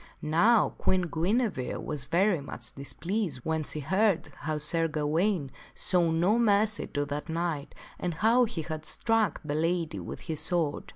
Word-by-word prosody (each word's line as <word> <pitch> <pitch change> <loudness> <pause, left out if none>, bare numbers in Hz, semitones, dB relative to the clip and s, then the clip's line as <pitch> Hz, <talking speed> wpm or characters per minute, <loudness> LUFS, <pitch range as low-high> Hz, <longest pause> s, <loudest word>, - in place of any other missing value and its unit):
Now, 190 +10 +4
Queen 185 -1 +2
Guinevere 175 - 0
was 145 -4 -4
very 180 +1 +2
much 120 -4 -7
displeased 165 - -3
when 160 -1 -1
she 150 +1 -4
heard 190 +5 +1
how 155 +1 -2
Sir 165 +2 +1
Gawaine 160 +4 0
would 135 - -10 0.2
show 175 -3 +3
no 175 +8 +2
mercy 215 -1 +2
to 145 0 -2
that 145 +2 -5
knight 160 -3 -3 0.2
and 175 -2 -2
how 230 +7 +4
he 195 -8 -4
had 155 -1 -5
struck 220 0 +1
the 145 - -2
lady 165 +1 0
with - - -7
his 160 -3 -4
sword. 160 -2 -1
165 Hz, 165 wpm, -29 LUFS, 150-200 Hz, 0.2 s, Now